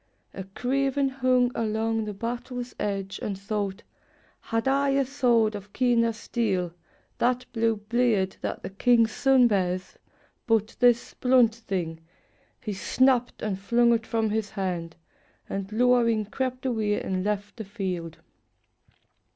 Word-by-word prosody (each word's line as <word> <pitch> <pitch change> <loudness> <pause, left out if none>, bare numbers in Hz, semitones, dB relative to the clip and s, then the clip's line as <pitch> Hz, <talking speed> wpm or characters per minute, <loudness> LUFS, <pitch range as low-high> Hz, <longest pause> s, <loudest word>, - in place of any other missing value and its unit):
A 190 - -6
craven 270 +6 0
hung 255 -2 +2
along 225 0 -1
the 210 - -4
battle's 245 +2 -5
edge. 195 -1 -3
And 200 -2 -3
thought: 200 -1 -3 0.6
"Had 225 +3 -2
I 275 +1 +2
a 275 0 +2
sword 240 -5 +2
of 205 -1 -9
keener 235 -2 +2
steel 205 -6 -2 0.2
— - - -38
That 250 +1 +1
blue 225 -1 +2
blade 210 -2 0
that - - -4
the - - -6
king's 230 +2 +3
son 265 0 +4
bears, 185 -3 -1 0.2
— - - -37
but 225 -1 +1
this 245 -2 +3
Blunt 250 -3 +4
thing!" 185 -8 -4 0.6
He 215 -4 -4
snapped 250 +5 +1
and 200 -3 -2
flung 235 +4 +3
it 230 -1 -1
from 225 -2 0
his 215 -1 -1
hand, 180 -5 -3 0.5
And 195 +1 -4
lowering 230 -1 +3
crept 255 +4 -3
away 220 -5 0
and 185 -1 -2
left 205 +1 -3
the 220 - -5
field. 185 -5 -4
225 Hz, 145 wpm, -26 LUFS, 200-245 Hz, 0.6 s, son